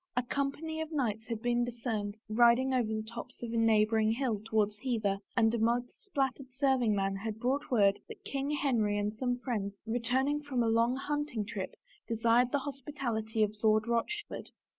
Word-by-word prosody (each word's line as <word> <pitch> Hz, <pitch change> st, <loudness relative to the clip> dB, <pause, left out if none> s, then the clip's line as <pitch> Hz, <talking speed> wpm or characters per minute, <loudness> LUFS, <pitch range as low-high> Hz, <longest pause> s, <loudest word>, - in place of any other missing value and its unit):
A 250 Hz, -, +3 dB
company 280 Hz, +5 st, -2 dB
of 320 Hz, 0 st, -5 dB
knights 225 Hz, -7 st, -1 dB
had 225 Hz, -2 st, -4 dB
been 240 Hz, 0 st, +2 dB
discerned 225 Hz, -4 st, -3 dB
riding 240 Hz, +4 st, +4 dB
over 245 Hz, -3 st, +2 dB
the 215 Hz, 0 st, -2 dB
tops 235 Hz, +2 st, -9 dB
of 235 Hz, -1 st, -4 dB
a -, -, -1 dB
neighboring 220 Hz, -1 st, +3 dB
hill 235 Hz, -4 st, -1 dB
towards 210 Hz, -2 st, 0 dB
Hever 215 Hz, -6 st, 0 dB, 0.2 s
and 225 Hz, -1 st, +4 dB
a 235 Hz, -, 0 dB
mud 240 Hz, +2 st, +1 dB
spattered 270 Hz, -7 st, -3 dB
serving 255 Hz, -4 st, +2 dB
man 195 Hz, 0 st, 0 dB
had 215 Hz, +1 st, -4 dB
brought 270 Hz, +5 st, 0 dB
word 200 Hz, -5 st, +4 dB
that -, -, -11 dB
King 275 Hz, 0 st, -2 dB
Henry 240 Hz, -8 st, +1 dB
and 205 Hz, +1 st, -1 dB
some 245 Hz, +1 st, -1 dB
friends, 210 Hz, -6 st, -3 dB
returning 255 Hz, +6 st, +1 dB
from 265 Hz, -5 st, -1 dB
a -, -, +1 dB
long 230 Hz, +2 st, +3 dB
hunting 290 Hz, -5 st, -2 dB
trip, 200 Hz, -2 st, -5 dB, 0.3 s
desired 230 Hz, +2 st, +3 dB
the 285 Hz, -, +1 dB
hospi 285 Hz, +1 st, -7 dB
tality 220 Hz, -4 st, 0 dB
of 210 Hz, 0 st, -1 dB
Lord 215 Hz, 0 st, +4 dB
Rochford. 235 Hz, -, -2 dB
235 Hz, 185 wpm, -31 LUFS, 220-265 Hz, 0.3 s, riding